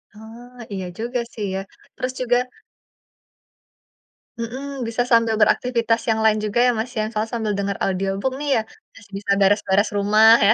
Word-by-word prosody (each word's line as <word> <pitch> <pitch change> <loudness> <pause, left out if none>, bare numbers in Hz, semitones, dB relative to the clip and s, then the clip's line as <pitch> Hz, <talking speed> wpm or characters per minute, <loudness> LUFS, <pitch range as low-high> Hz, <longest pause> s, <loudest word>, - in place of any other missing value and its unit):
Oh, 235 +3 -13 0.2
iya 190 -1 -4
juga 240 +2 -2
sih 210 - -4
ya, - - -1 0.4
terus 255 0 -3
juga 245 -1 +2 2.0
Mhm, 265 +4 -5
bisa 230 +1 -1
sambil 230 -1 +4
beraktivitas 230 0 +2
yang 220 - +2
lain 215 -1 +4
juga 215 +2 -1
ya, 250 - +4
Mas, 220 +3 -2
ya. 215 - +1
Misalnya 215 0 -3
sambil 220 -3 -1
dengar 200 0 -2
audiobook 195 +5 -1
nih 295 0 -3
ya, - - +2 0.3
masih 205 -2 -17
bisa 200 - -2
beres-beres 200 0 +3
rumah 215 +2 +6
ya. 210 +2 +6
220 Hz, 160 wpm, -22 LUFS, 205-240 Hz, 2.0 s, rumah